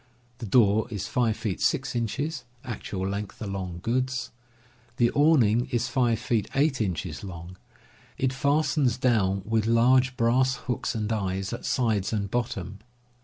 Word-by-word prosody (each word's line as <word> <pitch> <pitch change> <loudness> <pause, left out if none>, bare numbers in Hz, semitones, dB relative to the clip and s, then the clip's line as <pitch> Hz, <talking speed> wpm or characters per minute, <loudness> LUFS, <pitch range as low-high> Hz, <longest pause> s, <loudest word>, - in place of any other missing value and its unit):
The 115 - -5
door 110 0 +4
is 105 -4 -4
5 115 -3 +1
feet 110 -4 -3
6 135 -6 0
inches 135 +5 -2 0.2
(actual 100 -6 -4
length 100 +1 -5
along 95 -4 -5
goods). 130 +1 -1 0.7
The 120 -2 +3
awning 125 -7 +4
is 125 -1 -1
5 120 -3 +2
feet 110 -2 -1
8 135 -2 +2
inches 90 -6 -3
long; 90 -1 -8 0.6
it 130 0 0
fastens 140 -2 +1
down 100 -7 +1
with 110 0 0
large 125 +2 +4
brass 125 +3 +3
hooks 125 -1 -3
and 110 0 -1
eyes, 95 -1 -2
at 120 - -6
sides 110 -6 +1
and 100 -2 -2
bottom. 100 -5 -3
115 Hz, 145 wpm, -26 LUFS, 100-130 Hz, 0.7 s, door